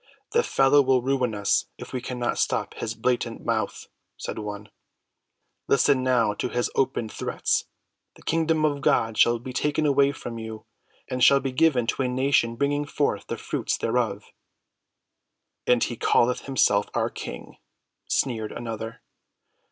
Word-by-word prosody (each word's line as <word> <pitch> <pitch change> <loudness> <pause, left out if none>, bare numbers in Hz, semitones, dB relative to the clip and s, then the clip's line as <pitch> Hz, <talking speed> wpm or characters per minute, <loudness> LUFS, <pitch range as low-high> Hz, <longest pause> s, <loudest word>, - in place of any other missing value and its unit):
"The 465 +2 +4
fellow 140 - +4
will 130 -2 +2
ruin 130 -4 0
us 100 -1 +1
if - - -10
we 130 - -2
cannot 125 -1 -2
stop - - 0
his 110 0 -4
blatant 120 0 -1
mouth," 110 -3 -1 0.3
said - - -5
one. 105 0 -6 1.0
"Listen 140 -1 +3
now 120 -5 +2
to 115 - -3
his 120 0 -1
open 125 -4 0
threats: - - -1 0.5
'The - - -18
kingdom 160 -1 +1
of 145 -2 0
God 115 -4 +2
shall 120 +2 +4
be 125 +2 -8
taken 150 +3 0
away 140 -1 +4
from 120 -4 -7
you, 110 -1 -8 0.4
and 125 -1 -1
shall 140 - +7
be 135 -1 -3
given 130 -3 +3
to 120 - -1
a 130 - +1
nation 125 -2 +1
bringing 145 +3 0
forth 140 -8 -1
the - - -4
fruits - - -2
thereof.'" - - -1 1.4
"And 125 -1 +4
he 120 - -3
calleth 125 +3 +2
himself 105 -6 +2
our - - 0
King," - - -8 0.5
sneered 115 -5 0
another. 115 -1 -6
125 Hz, 150 wpm, -25 LUFS, 115-140 Hz, 1.4 s, shall